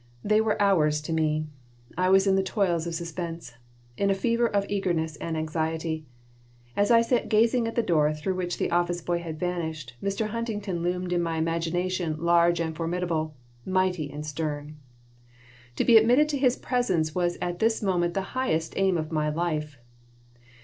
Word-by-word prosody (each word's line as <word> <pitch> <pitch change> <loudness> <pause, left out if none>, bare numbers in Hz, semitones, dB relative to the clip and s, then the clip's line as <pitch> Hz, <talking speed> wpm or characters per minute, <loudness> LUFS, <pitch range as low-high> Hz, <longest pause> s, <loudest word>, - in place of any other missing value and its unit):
They 215 +1 +3
were 220 -1 0
hours 160 -7 +3
to 155 +2 -4
me. 155 -1 +1 0.5
I 185 +1 +1
was 195 +1 +5
in 195 -1 +3
the 195 - +3
toils 185 -4 0
of 170 - -3
suspense, 165 -4 -5 0.4
in 200 - +1
a 195 - +3
fever 235 +4 +1
of 200 -2 0
eagerness 175 -6 -1
and 165 -1 -3
anxiety. 160 0 -2 0.7
As 205 0 +2
I 230 -1 +6
sat 245 +1 0
gazing 230 +2 +3
at 230 - -5
the 235 - +2
door 155 -5 +3
through 155 +5 -2
which 180 -1 -3
the - - -1
office 175 0 +1
boy 175 0 -1
had 160 -2 -6
vanished, 160 -7 -3
Mr. 200 +2 -1
Huntington 210 -6 -3
loomed 180 +1 -1
in 175 - +1
my 165 -1 -2
imagination 165 +1 -1
large 170 +1 +3
and 160 -1 -2
formidable, 165 -2 -2 0.3
mighty 185 -5 0
and 150 +1 -6
stern. 150 0 -4 1.0
To - - 0
be 235 -2 +8
admitted 245 +7 +5
to 285 -2 -1
his 255 -2 +3
presence 180 - 0
was 175 -1 0
at 175 0 -3
this 225 0 +1
moment 175 -3 +1
the 195 - +1
highest 165 -12 -1
aim 190 -2 +2
of 155 0 -4
my 155 -1 0
life. 150 -3 -2
175 Hz, 175 wpm, -26 LUFS, 160-195 Hz, 1.0 s, be